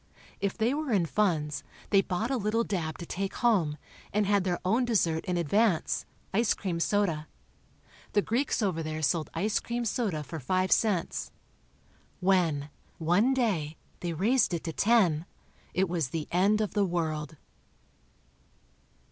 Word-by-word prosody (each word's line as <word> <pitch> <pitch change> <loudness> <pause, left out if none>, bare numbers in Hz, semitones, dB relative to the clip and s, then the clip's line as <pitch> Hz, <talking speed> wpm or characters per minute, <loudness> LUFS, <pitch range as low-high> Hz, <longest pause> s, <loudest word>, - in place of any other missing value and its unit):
If 200 -1 -2
they 230 +3 +2
were 300 -2 -2
in 190 -6 +3
funds, 160 -6 0 0.3
they 195 - +6
bought 195 +6 -2
a 265 - +1
little 220 +1 +1
dab 160 -8 -3
to 170 - -7
take 195 +3 -3
home, 185 -11 +2 0.3
and 210 0 +2
had 200 -1 +3
their 175 -2 +1
own 225 +7 +3
dessert 175 -9 +1
in 180 -2 -1
advance—ice 205 +4 +1
cream 175 -4 -3
soda. 170 -5 +1 0.9
The 205 - +3
Greeks 245 0 0
over 180 -5 0
there 155 0 -4
sold 155 +2 +1
ice 205 +6 +1
cream 240 0 -3
soda 200 -9 -1
for 160 +3 -6
five 185 +7 0
cents. 205 -7 +1 0.9
When, 170 -6 +2 0.3
one 190 +11 +3
day, 175 - 0 0.2
they 175 -1 -3
raised 215 +3 +2
it 165 - -5
to 165 - -4
ten, 185 -8 +3 0.4
it 190 +1 +1
was 165 -6 -1
the 155 +1 -3
end 200 +5 +3
of 210 - -2
the 205 - +2
world. 160 -4 -2
185 Hz, 150 wpm, -29 LUFS, 160-215 Hz, 0.9 s, they